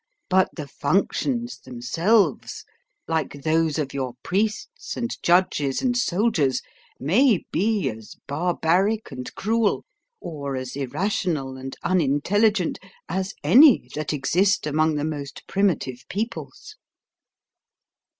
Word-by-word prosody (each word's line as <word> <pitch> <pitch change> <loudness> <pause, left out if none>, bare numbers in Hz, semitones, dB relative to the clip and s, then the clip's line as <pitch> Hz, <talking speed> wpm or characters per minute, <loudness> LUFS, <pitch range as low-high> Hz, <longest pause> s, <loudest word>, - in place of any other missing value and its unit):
But 190 0 +4
the 150 -4 -6
functions 235 - -1
themselves, 165 - 0 0.4
like 155 -3 -2
those 160 -1 +2
of 150 -3 -2
your 130 -3 -3
priests 210 +3 -2
and 235 0 -2
judges 170 -6 +2
and 250 -2 +1
soldiers, 180 - +1 0.4
may 205 - +3
be 210 +2 +1
as 110 -1 -7
barbaric 175 +6 +1
and 125 -1 -6
cruel, 220 +1 0 0.3
or 140 -4 -5
as 130 0 -5
irrational 140 0 -2
and 130 0 -7
unintelligent, 185 +4 +2 0.3
as 190 +3 -3
any 260 - +6
that 155 0 -3
exist 180 +7 +1
among 155 +1 +1
the 145 0 -1
most 145 -3 -6
primitive 145 - 0
peoples. 230 - -5
165 Hz, 110 wpm, -24 LUFS, 140-205 Hz, 0.4 s, any